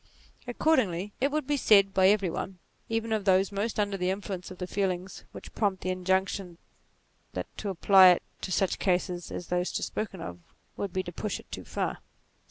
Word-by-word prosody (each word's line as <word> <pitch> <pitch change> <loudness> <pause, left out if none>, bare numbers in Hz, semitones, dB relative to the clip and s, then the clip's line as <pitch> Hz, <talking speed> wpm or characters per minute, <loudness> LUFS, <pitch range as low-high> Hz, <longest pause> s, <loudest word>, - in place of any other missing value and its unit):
Accordingly 210 - +1
it 275 - +3
would 305 -1 -1
be 290 +1 0
said 200 -6 +5
by 190 -1 +5
every 195 -3 +3
one, 190 +2 -5 0.3
even 225 0 -1
of 215 -2 0
those 190 +1 +3
most 210 +3 -2
under 205 -1 0
the 180 0 0
influence 190 -2 -4
of 185 - -10
the 180 - -4
feelings 185 -1 -3
which - - -11
prompt 200 -4 0
the 185 - 0
injunction, 190 -1 -1 0.8
that - - -6
to 205 - -3
apply 190 +1 +7
it 180 - +3 0.2
to 185 - -4
such 190 +1 +1
cases 180 -1 0
as 175 - -6
those 180 0 0
just - - -2
spoken 205 -4 -4
of, 90 - -7 0.4
would 200 - -3
be 185 +1 -1
to 175 - -7
push 205 +4 -3
it - - -17
too - - -6
far. - - -3
190 Hz, 195 wpm, -28 LUFS, 180-205 Hz, 0.8 s, apply